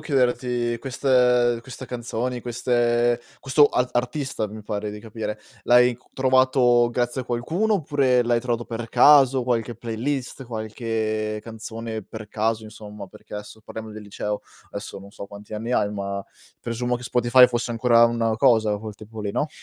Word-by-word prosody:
chiederti, 125 -4 0
queste 125 -2 +2
queste 130 0 -9
canzoni, 120 0 -3
queste 120 0 +1 0.2
questo 145 +2 +5
ar 125 -2 0
artista 125 -2 -1
mi 110 +1 -9
pare 105 0 -4
di 105 - -8
capire, 110 -1 -5 0.3
l'hai 125 0 +5
cu 125 - -30
trovato 130 -2 +4
grazie 120 +2 -1
a - - -6
qualcuno 165 - 0
oppure 140 -7 +2
l'hai 120 0 +1
trovato 120 -1 -2
per 115 0 -6
caso, 135 -3 +6
qualche 120 -1 -1
playlist 125 +4 -4
qualche 110 -2 -3
canzone, 115 -1 -6
per 110 +1 -10
caso 110 +1 -1
insomma, 105 -2 -10
perché 105 - -11
esso 105 +1 -9
parliamo 110 0 -8
del 105 0 -9
liceo, 105 0 -4 0.3
esso 100 -1 -6
non 100 +1 -13
so 100 - -9
quanti 100 +1 -12
anni 115 +3 -3
hai, 105 -4 +2
ma 100 -1 -4 0.4
presumo 120 +1 -2
che 120 - -11
Spotify 125 +1 +5
fosse 120 -1 -2
ancora 115 0 +5
una 115 -1 0
cosa 110 -2 +3
col 110 0 -7
tempo 110 +1 -10
lì, 100 -1 -2
no? 150 +8 -1
120 Hz, 160 wpm, -24 LUFS, 110-125 Hz, 0.4 s, caso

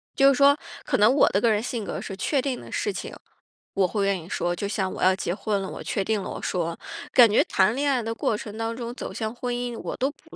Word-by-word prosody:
就 275 0 +5
是 275 - +5
说， 280 +2 +6 0.3
可 - - +1
能 215 +4 +5
我 285 - +5
的 200 - +1
个 230 - +4
人 210 0 +1
性 235 -2 -3
格 - - -4
是 195 - -6
确 270 +8 +1
定 260 -2 -2
的 - - -11
事 415 - -1
情， - - -6 0.6
我 190 -2 +3
会 200 0 -1
愿 195 -2 +1
意 165 - -12
说， 175 -3 -1
就 200 - -3
像 190 -2 -1
我 - - -4
要 185 0 +5
结 175 - -2
婚 205 -1 -1
了， 190 - -4
我 - - -7
确 195 - -1
定 220 +1 0
了， - - -5
我 - - -6
说， 170 -2 -2 0.4
感 240 -3 +8
觉 - - +5
谈 195 +4 +2
恋 285 +1 +1
爱 255 -3 +1
的 225 0 -3
过 220 - 0
程 210 0 -7
当 225 0 -2
中 235 -1 -5
走 - - -6
向 220 +2 -3
婚 245 0 -3
姻， 245 -1 -3
我 - - -5
都 265 +2 +1
不 315 +2 -18
220 Hz, 300 characters per minute, -25 LUFS, 195-245 Hz, 0.6 s, 感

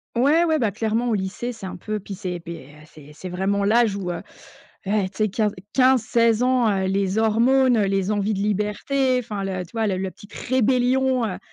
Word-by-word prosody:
Ouais, 290 +8 +4
ouais, 320 -2 +2
bah 225 -7 0
clairement, 225 +3 -1
au - - +1
lycée, 205 +5 -3
c'est 200 -4 -8
un - - -7
peu 215 +3 -4
puis 195 0 -8
c'est 180 -2 -5
beh, 165 -6 -8 0.2
heu, - - -15
c'est 150 -1 -14
c'est 185 +4 -8
vraiment 195 +3 -1
l'âge 220 0 +3
où, 185 -3 -4
heu, 170 - -5 0.6
eh 200 -1 +1
tu 190 - -27
sais 215 -1 +1
15-15-16 230 +3 +2
ans, 250 -2 +3
heu, 190 -1 0
les 195 +2 0
hormones, 240 +3 +3
les 195 0 0
envies 210 +1 0
de 195 - -3
liberté, 210 +6 0
enfin 210 -4 -5
le 185 -2 -3
tu - - -21
vois 225 -1 0
le 190 -2 -1
le 190 0 -3
petite 205 - -16
rébellion, 255 0 +1
heu 185 - -5
210 Hz, 210 wpm, -23 LUFS, 195-245 Hz, 0.6 s, Ouais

